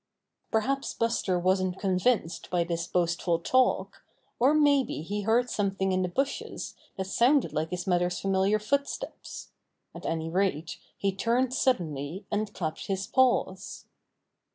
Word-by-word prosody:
Perhaps 270 +5 0
Buster 230 -5 0
wasn't 185 +1 +1
convinced 190 -1 0
by 175 -1 +1
this 170 0 -3
boastful 170 -1 +1
talk, 255 +9 +1 0.4
or 260 +4 +5
may 290 -2 +5
be 155 - -5
he 205 +5 -3
heard 230 +4 +2
something 195 -4 -1
in 185 0 +1
the 180 - +1
bushes 275 +9 -3 0.2
that 190 - -2
sounded 245 +8 +3
like 155 +1 -1
his 180 0 -4
mother's 180 -1 +1
familiar 195 +2 +2
footsteps. 280 +7 -3 0.4
At - - -7
any 160 0 -2
rate, 175 -4 -1 0.2
he 200 - 0
turned 240 +5 +1
suddenly, 175 - -1
and 210 0 -1
clapped 160 -6 -4
his 195 0 -1
paws. 240 -7 +1
195 Hz, 140 wpm, -28 LUFS, 175-235 Hz, 0.4 s, or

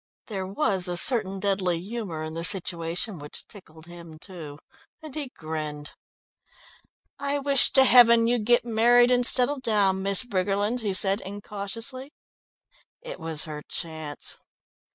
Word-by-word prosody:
There 195 -4 -6
was 195 -4 -1
a 175 0 -2
certain 195 -3 +4
deadly 190 -3 -1
humour 190 -5 -6
in 155 0 -7
the 165 +1 -5
situation 175 0 -2
which 145 0 -11
tickled 160 -6 -14
him 170 -2 -13
too, 155 -5 -10 0.4
and 310 -3 -12
he 295 -4 -5
grinned. 155 -5 -7 1.3
"I 280 0 -2
wish 280 -1 +4
to 265 - +6
heaven 235 -3 +6
you'd 235 -2 -1
get 240 0 +3
married 240 +2 +3
and 245 0 +2
settle 255 +3 +5
down, 200 -6 0
Miss 195 +3 +3
Briggerland," 205 +1 -2
he 210 -4 -3
said 195 +2 +3
incautiously. 210 +7 -5 0.9
It - - -9
was 160 -2 -3
her 150 -1 -8
chance. 160 -3 -6
200 Hz, 140 wpm, -24 LUFS, 170-240 Hz, 1.3 s, to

